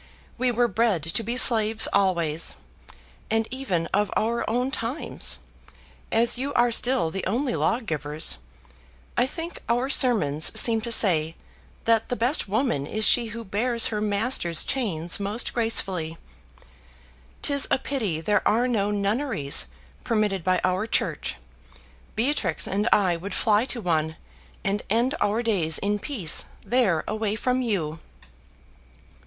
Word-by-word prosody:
We 250 0 +1
were 240 +1 +2
bred 220 -6 +1
to 165 +7 -2
be 235 +3 -3
slaves 220 -3 +5
always; 170 -5 +1 0.7
and 225 0 +1
even 220 -11 -1
of 205 0 +2
our 235 +2 0
own 250 +4 0
times, 245 +5 -1 0.7
as 235 +2 +3
you 275 +2 -2
are 240 0 +3
still 230 -9 +3
the 195 +1 -4
only 245 +6 -1
lawgivers, 155 - -1 0.8
I 245 +1 +2
think 330 +4 -5
our 245 +3 +1
sermons 200 - +2
seem 225 -2 +3
to 235 +1 -5
say 165 -7 +3 0.5
that 225 -1 +2
the 245 - 0
best 245 +5 +1
woman 210 - 0
is 215 +5 -1
she 235 -2 +4
who 230 +1 -7
bears 230 +4 +1
her 210 - -1
master's 205 -5 0
chains 175 -11 0
most 205 +4 -1
gracefully. 185 -8 -1 1.3
'Tis 280 -1 +2
a - - +3
pity 225 - -2
there 210 +5 +2
are 235 +4 +2
no 210 -5 0
nunneries 200 - 0 0.4
permitted 210 -5 0
by 185 0 +2
our 185 +4 0
church: - - -1 0.8
Beatrix 225 - 0
and 205 +4 0
I 185 -4 +3
would 190 +3 -6
fly 215 +1 +2
to 255 - -3
one, 160 -5 0 0.5
and 200 +1 -1
end 235 +6 +2
our 210 +3 +1
days 175 -9 +2
in 205 +1 -1
peace 200 - 0 0.2
there 230 -10 +2
away 215 -1 -1
from 250 +3 0
you." 170 -10 -2
215 Hz, 140 wpm, -25 LUFS, 185-240 Hz, 1.3 s, slaves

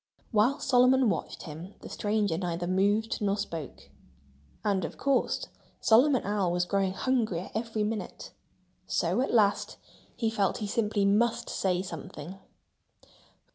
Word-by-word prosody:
While 240 +6 +3
Solomon 255 -1 +4
watched - - -4
him 165 +5 -9
the - - -9
stranger 205 -4 0
neither 175 0 -2
moved 205 +5 +1
nor 200 -1 +1
spoke. 165 -8 -6 0.7
And, 200 -2 +1
of - - -5
course, 275 -1 +1 0.3
Solomon 255 +3 +4
Owl 200 -3 0
was 175 0 +1
growing 195 0 0
hungrier 220 -7 -1
every 220 -1 -2
minute. 215 0 -4 0.6
So - - +1
at 270 - -1
last 205 -3 +2 0.4
he 225 -2 0
felt 200 -4 +1
that - - -7
he 210 - -2
simply 210 -1 0
must 235 +4 +2
say 185 -1 0
something. 170 +1 -8
205 Hz, 135 wpm, -29 LUFS, 185-225 Hz, 0.7 s, Solomon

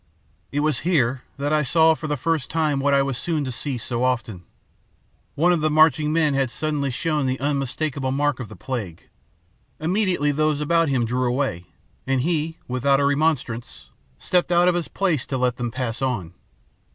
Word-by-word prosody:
"It 145 - 0
was 150 -4 +1
here 135 -7 +1 0.2
that 145 +2 -1
I 155 - +3
saw 160 +3 +4
for 155 0 -6
the 150 -1 -1
first 160 +1 -1
time 155 -4 0
what 140 +1 +1
I 140 0 +4
was 135 -3 -3
soon 160 -4 -1
to 130 - -3
see 130 +2 -4
so 120 +1 -3
often. 120 -7 -1 0.9
One 170 +4 +3
of 170 - 0
the 155 - +2
marching 155 0 +4
men 155 -2 +2
had 135 -2 +1
suddenly 145 0 -2
shown 150 +2 -1
the 130 0 -1
unmistakable 140 0 -2
mark 145 0 0
of 125 - -6
the 110 - -10
plague. 100 -5 -6 0.7
Immediately 175 -3 +1
those 155 0 +1
about 165 +1 +2
him 125 -4 +1
drew 125 +2 0
away, 125 -9 -2 0.4
and 135 -1 +1
he, 160 +1 -1
without 135 +2 +2
a 140 - +2
remonstrance, 140 -5 -1 0.3
stepped 180 - 0
out 175 +1 +4
of 180 - +4
his 175 -2 -2
place 170 -9 -1
to 135 - -2
let 125 -1 0
them 120 -1 -2
pass 120 0 -3
on. 105 -11 -2
140 Hz, 190 wpm, -23 LUFS, 125-155 Hz, 0.9 s, saw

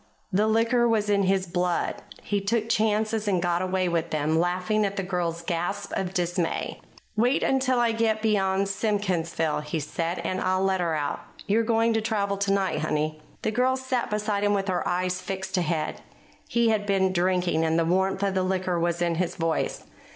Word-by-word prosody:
The 210 +3 +3
liquor 230 +2 +3
was 210 -2 +1
in 200 -1 +3
his 190 0 +2
blood. 175 0 -1 0.3
He 205 -1 -1
took 220 +2 0
chances 215 0 +1
and 190 -3 +2
got 175 0 0
away 185 0 0
with 170 -1 -1
them, 155 +1 +1
laughing 180 +5 +1
at 200 -1 -1
the 195 - -2
girl's 175 -2 -2
gasps 175 +4 -3
of 185 -2 -2
dismay. 175 -1 -1 0.3
"Wait 245 +5 +2
until 260 -2 +2
I 235 -1 +3
get 225 -1 +1
beyond 195 -2 +2
Simkinsville," 185 -6 0
he 150 +2 -3
said, 165 +4 -3
"and 185 0 -2
I'll 185 +1 +1
let 190 -1 +1
her 165 -2 0
out. 145 -1 -2 0.3
You're 215 +3 +2
going 230 0 +2
to 225 - +1
travel 205 -3 -1
tonight, 195 -1 +1
honey." 155 0 -1 0.2
The - - +1
girl 255 +3 +2
sat 260 -2 -2
beside 210 -1 -1
him 205 0 +3
with 195 0 -1
her 180 - 0
eyes 180 +1 -1
fixed 190 0 -4
ahead. 165 -3 -1 0.5
He 235 -1 +2
had 210 -2 0
been 190 -1 +2
drinking, 180 -2 +1
and 160 0 +1
the 165 - +2
warmth 190 +3 +1
of 195 -1 +1
the 190 - +1
liquor 185 -1 0
was 170 +1 0
in 170 -1 +1
his 180 - -2
voice. 165 -2 -1
190 Hz, 190 wpm, -26 LUFS, 175-215 Hz, 0.5 s, The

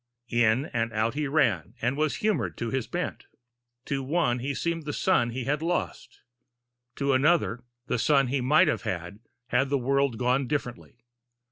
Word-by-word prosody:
In 120 +2 +3
and 115 -1 0
out 110 +1 0
he 145 +1 -2
ran, 115 - +1
and 120 +3 0
was 155 0 0
humored 215 -1 -1
to 115 -1 -3
his 130 -3 -2
bent. - - -4 0.6
To 140 -1 -2
one 130 -3 0
he 135 +3 -3
seemed 170 -2 -2
the 145 - -3
son 120 -2 +2
he 125 +2 -4
had 145 +4 -1
lost, 175 +2 -3 0.7
to 140 -1 +1
another 135 -3 +2 0.2
the 125 - -1
son 140 +1 +4
he 130 +1 -1
might 155 +8 +4
have 155 - 0
had, 90 +3 -5 0.3
had 130 +3 +2
the 140 - +2
world 135 -1 +1
gone 125 +3 +1
differently. 120 -4 -5
130 Hz, 170 wpm, -27 LUFS, 120-145 Hz, 0.7 s, son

